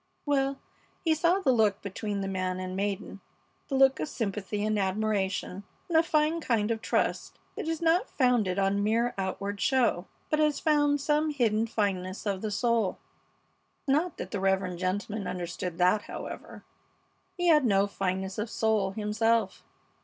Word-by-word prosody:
Well, 275 -1 +1 0.5
he 320 - +4
saw 340 +5 +2
the 270 - +3
look 215 -5 +2
between 200 +1 -3
the 195 - -2
man 185 -1 -2
and 185 0 -4
maiden; 200 0 -3 0.5
the 275 - -2
look 270 0 +5
of - - -2
sympathy 210 -1 -3
and 215 -1 +1
admiration 195 -1 -1 0.2
and 340 - -3
a 320 - +7
fine 315 0 +1
kind 230 -5 +1
of 225 -1 -2
trust - - -1 0.2
that - - -5
is 325 0 -2
not 340 +7 +3
founded 240 -8 +2
on 200 +1 +1
mere 230 +3 +1
outward 200 +1 -3
show, 250 -8 +2 0.2
but 305 - +2
has 300 -2 +2
found 290 -2 +2
some 300 +2 +1
hidden 230 -6 +1
fineness 195 -3 -2
of 195 -2 -1
the 215 - -2
soul. 225 -1 +1 0.9
Not 305 +6 +1
that - - -6
the 205 - -2
reverend 190 -2 0
gentleman 200 +3 -2
understood 180 -1 -4
that, 185 +4 +3
however. - - -8 0.7
He 355 -1 +2
had 300 -3 +6
no 200 -4 +3
fineness 190 0 -3
of 215 +2 -2
soul 215 -4 +1
himself. 220 +2 0
215 Hz, 160 wpm, -28 LUFS, 195-270 Hz, 0.9 s, a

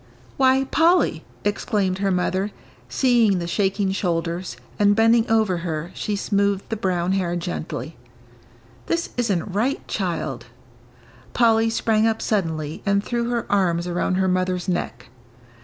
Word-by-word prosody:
"Why, 265 0 +4
Polly," 330 +6 +2 0.2
exclaimed 205 -2 0
her 200 0 +1
mother, 185 +2 0 0.4
seeing 230 - +3
the 175 - -3
shaking 195 +2 0
shoulders, 170 - -2 0.2
and, 205 0 +4
bending 225 +1 +4
over 220 -5 +2
her, 165 0 -4
she 210 - -3
smoothed 200 -1 0
the 225 - -1
brown 185 -3 -1
hair 180 -3 0
gently, 165 -2 -5 0.9
"this 335 0 -1
isn't 200 -6 -1
right, 240 +8 -1
child 165 - -3 0.4
" 125 -1 -26
Polly 225 -1 +3
sprang 225 -1 +2
up 225 0 0
suddenly 160 -7 -2
and 200 0 +1
threw 235 0 -2
her 240 -1 -1
arms 175 -4 +1
around 175 +1 -1
her 190 0 +1
mother's 185 -1 0
neck. 120 - -3
195 Hz, 140 wpm, -22 LUFS, 175-225 Hz, 0.9 s, Why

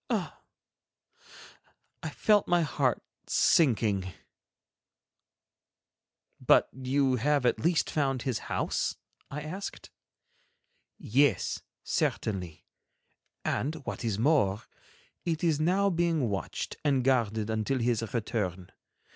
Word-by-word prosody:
Ah! - - -2 1.6
I - - -4
felt 210 -2 +2
my 175 -1 +3
heart 140 -4 0 0.2
sinking. 105 - +3 2.3
"But - - +4
you 130 0 +1
have 140 +2 +1
at 120 - +2
least 165 0 +2
found 135 -4 0
his 130 -4 -1
house?" - - -1 0.3
I 150 +2 -5
asked. 180 +7 -7 1.1
"Yes, 140 +3 +1 0.2
certainly; 90 -7 -2 0.8
and 150 +5 -1
what - - -5
is 110 -4 -1
more, 110 -5 +2 0.6
it 165 -2 -2
is 160 -4 +2
now 190 +5 +2
being 165 -7 +1
watched 95 -4 -4
and 140 -4 +2
guarded 110 -4 +1
until 110 +5 0
his 120 -2 +1
return. 100 -6 -3
130 Hz, 100 wpm, -29 LUFS, 110-155 Hz, 2.3 s, But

